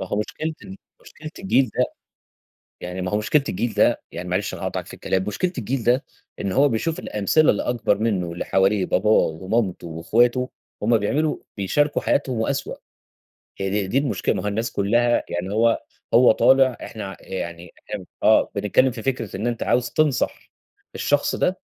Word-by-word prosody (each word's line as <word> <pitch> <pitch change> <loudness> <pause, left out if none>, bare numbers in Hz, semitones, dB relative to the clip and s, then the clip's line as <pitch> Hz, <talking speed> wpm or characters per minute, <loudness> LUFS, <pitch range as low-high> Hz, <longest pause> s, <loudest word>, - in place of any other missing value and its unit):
ما 95 - -4
هو 100 - -2
مشكلة 155 +9 -3
ال 190 0 -9 0.2
مشكلة 155 0 -10
الجيل 135 - +2
ده - - +5 1.0
يعني 90 +1 -5
ما 90 - -3
هو 105 - +2
مشكلة 135 +7 +2
الجيل 115 +5 -2
ده، - - +3
يعني 90 0 -6
معلش 90 +1 -1
أنا - - -7
هاقاطعك - - -3
في - - -12
الكلام، 95 0 -1
مشكلة 175 - -1
الجيل 125 +1 -2
ده، 125 +4 +3 0.4
إن 100 - -2
هو 140 +7 +4
بيشوف 150 +8 -1
الأمثلة 105 +9 +2
اللي 100 - -2
أكبر 115 -4 +1
منه 100 -5 0
واللي 85 +1 -5
حواليه 95 0 +2
باباه، 105 +4 +1
ومامته 95 +1 +1
واخواته 120 +10 +1 0.3
همّ 115 +2 +4
بيعملوا 145 +9 0 0.2
بيشاركوا 145 +10 +1
حياتهم 130 -4 0
وأسوأ. 110 - -2 0.8
هي 95 +1 -1
د - - -9
دي 125 - +1
المشكلة، 135 -9 0
ما - - -3
هو - - -2
الناس 110 +3 -2
كلها 120 +4 +2
يعني 90 +3 -3
هو 115 +1 +2 0.3
هو 120 +1 +7
طالع 130 +2 +4
إحنا 110 -2 -7
ع 95 - -8
يعني 85 -2 -6 0.2
إحنا - - -5 0.2
آه، - - +4
بنتكلم 130 +6 +2
في 115 -2 -8
فكرة 125 -7 -2
إن 105 +5 -2
أنت 120 -1 -2
عاوز 120 -1 +1
تنصح 150 -4 0 0.4
الشخص - - +1
ده - - 0
110 Hz, 180 wpm, -23 LUFS, 95-130 Hz, 1.0 s, هو